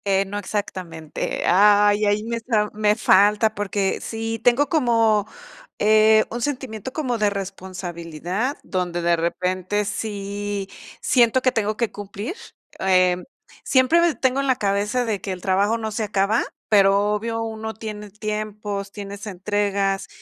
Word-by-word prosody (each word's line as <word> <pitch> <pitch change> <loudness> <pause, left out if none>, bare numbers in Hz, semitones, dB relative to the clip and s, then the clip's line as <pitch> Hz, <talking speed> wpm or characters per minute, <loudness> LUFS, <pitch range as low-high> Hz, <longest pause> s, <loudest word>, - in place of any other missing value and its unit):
Eh, 195 0 +2
no 205 +1 -4
exactamente, 185 -6 -4
ah, 205 +3 +6
ahí 205 +1 +1
ahí, 205 +1 +1
me 230 +1 -3
está 225 -3 0
me 210 0 +2
falta, 210 +1 +4
porque 200 -2 -1
sí, 225 0 -4
tengo 250 +4 +4
como, 230 -8 +2 0.5
eh, 215 +1 +5
un 240 +1 -4
sentimiento 260 -4 -4
como 255 -6 -2
de 210 -1 +3
responsabilidad, 185 - -4
donde 175 -2 -2
de 170 0 +3
repente, 185 +4 -1
sí 205 -1 -4 0.3
siento 250 0 +3
que 255 - +4
tengo 215 -2 -1
que 235 -3 -1
cumplir, 205 - -6 0.4
eh, 185 -1 +3 0.5
siempre, 260 +5 +4
eh, 315 - -3
tengo 260 0 +1
en 275 - -1
la 260 - +3
cabeza, 205 +4 0
de 210 -5 -2
que 190 - -3
el 180 - -9
trabajo 200 +4 +2
no 220 -1 -4
se 220 +1 -2
acaba, 205 +2 +1 0.2
pero 200 0 +4
obvio, 225 +2 -2
uno 220 0 -5
tiene 210 -1 -7
tiempos, 210 -1 -4
tienes 200 +1 -8
entregas, 200 0 -1
210 Hz, 150 wpm, -22 LUFS, 195-225 Hz, 0.5 s, ah